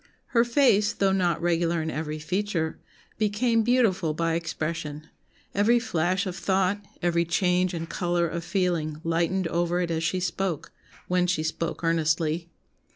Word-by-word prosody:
Her 235 -1 +4
face, 235 -5 +3
though 195 -1 +2
not 175 -4 +1
regular 170 0 +1
in 160 0 -2
'every 155 0 -3
feature,' 170 0 -2 0.4
became 225 +2 +2
beautiful 215 -9 +2
by 165 0 0
expression, 160 -2 -3 0.5
every 215 +5 +4
flash 185 -3 0
of 185 -2 -4
thought, 190 +2 +1 0.2
every 170 -1 +2
change 180 +1 +1
and 165 0 -4
colour 175 0 0
of 170 +1 -4
feeling 170 -4 -1
lightened 170 +2 0
over 175 +1 0
it 175 -1 -1
as 160 0 -1
she 185 +3 0
spoke, 180 -2 -2 0.4
when 180 0 +2
she 170 -3 0
spoke 165 +1 -3
earnestly. 165 0 +1
175 Hz, 150 wpm, -26 LUFS, 165-190 Hz, 0.5 s, Her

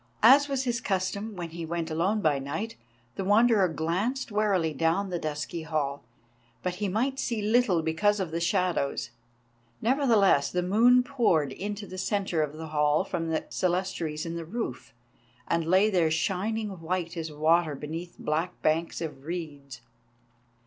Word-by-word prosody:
As 275 +5 +8
was 270 -1 0
his 240 -1 -1
custom 200 +2 -2
when 170 -2 -6
he 170 0 -6
went 165 0 -3
alone 190 +7 +1
by 150 -5 +2
night, 160 +12 -4 0.4
the - - -1
Wanderer 210 0 +4
glanced 185 +11 -2
warily 200 -6 +1
down 165 +6 0
the 175 - -1
dusky 155 +2 -4
hall, 150 -3 -2 0.6
but 180 -1 -2
he 205 - +1
might 250 +8 -1
see 235 -3 -1
little 210 -5 +2
because 205 +6 +1
of 185 -4 -2
the 165 - -2
shadows. 170 -7 0 0.7
Nevertheless, 225 - +3
the 180 0 0
moonlight 240 +7 +5
poured 215 - +2
into 205 +7 -5
the 185 -1 -8
centre 195 -4 0
of 150 -1 -2
the 160 0 -7
hall 150 +1 +2
from 165 -4 -3
the 160 - 0
clerestories 175 -4 -1
in 165 - -4
the 170 - -4
roof, 165 - -5 0.6
and 170 -1 0
lay 190 +4 +5
there 180 -6 +2
shining 195 +4 -1
white 170 0 -2
as 160 -2 -4
water 155 +1 +2
beneath 160 +5 -6
black 165 +4 -2
banks 165 +2 0
of 150 -4 -6
reeds. 145 -7 -6
175 Hz, 160 wpm, -28 LUFS, 160-210 Hz, 0.7 s, As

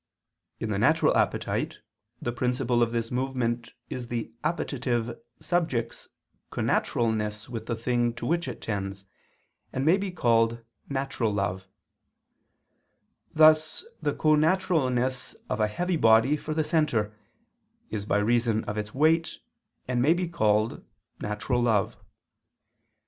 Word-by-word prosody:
In - - -3
the - - 0
natural - - +4
appetite - - 0 0.4
the 120 - -2
principle 125 0 0
of 115 -1 +2
this 115 -1 -2
movement 125 -2 -2
is 125 -2 -5
the 115 -1 -4
appetitive 120 -7 -1 0.2
subject's 155 -8 -1 0.4
connaturalness 110 -2 0
with 115 -2 -6
the 115 - -1
thing 120 +1 +1
to 120 - -6
which 170 +3 0
it 125 - -6
tends, 100 -2 -4 0.7
and 130 - -2
may 170 +5 +5
be 200 0 -3
called 115 -8 +2 0.3
"natural 135 -5 -1
love": 95 -2 -2 1.7
thus 155 - +5 0.2
the 145 - 0
connaturalness 150 -6 +1 0.2
of 105 - -1
a 105 - +3
heavy 175 +11 -1
body 115 +3 +5
for 155 +1 -4
the 155 - +2
centre, 150 - +1 0.8
is 105 -2 -3
by 105 0 +1
reason 115 +1 +2
of 105 +1 -3
its 105 +2 -6
weight 160 +3 +2 0.5
and 125 -1 0
may 155 +7 +4
be 180 0 -1
called 110 -8 +1 0.4
"natural 105 +4 -1
love." 110 -5 +2
120 Hz, 125 wpm, -27 LUFS, 110-150 Hz, 1.7 s, may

